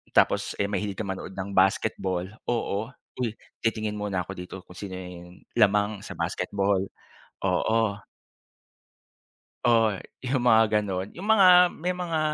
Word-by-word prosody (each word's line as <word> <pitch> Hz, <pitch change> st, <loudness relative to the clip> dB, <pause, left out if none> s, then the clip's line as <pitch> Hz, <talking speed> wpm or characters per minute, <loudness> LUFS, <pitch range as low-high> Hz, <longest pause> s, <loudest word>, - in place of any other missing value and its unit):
tapos -, -, +3 dB
eh 100 Hz, -, +2 dB
mahilig 105 Hz, -1 st, -2 dB
ka -, -, -1 dB
manood 95 Hz, -1 st, -5 dB
ng 95 Hz, +1 st, -5 dB
basketball, 95 Hz, -1 st, +1 dB, 0.2 s
oo. 110 Hz, -3 st, -1 dB, 0.3 s
Uy 115 Hz, -3 st, -1 dB, 0.2 s
titingin 110 Hz, -2 st, -1 dB
muna 100 Hz, -3 st, -1 dB
ako 90 Hz, -, -8 dB
dito 90 Hz, 0 st, -8 dB
kung 90 Hz, -, -14 dB
sino 95 Hz, 0 st, -6 dB
yung 90 Hz, -1 st, -10 dB, 0.2 s
lamang 105 Hz, +1 st, +3 dB
sa -, -, -9 dB
basketball, 100 Hz, -1 st, 0 dB, 0.6 s
oo. 110 Hz, -2 st, +1 dB, 1.7 s
Oo 115 Hz, -4 st, +4 dB
eh, -, -, -9 dB, 0.2 s
'yong 130 Hz, -1 st, -1 dB
mga 115 Hz, -2 st, +6 dB, 0.2 s
gano'n. 95 Hz, -2 st, -3 dB
'Yong 185 Hz, -, -6 dB
mga, 210 Hz, -3 st, +6 dB, 0.3 s
may 180 Hz, +3 st, -2 dB
mga 175 Hz, -3 st, -2 dB
105 Hz, 140 wpm, -26 LUFS, 95-115 Hz, 1.7 s, mga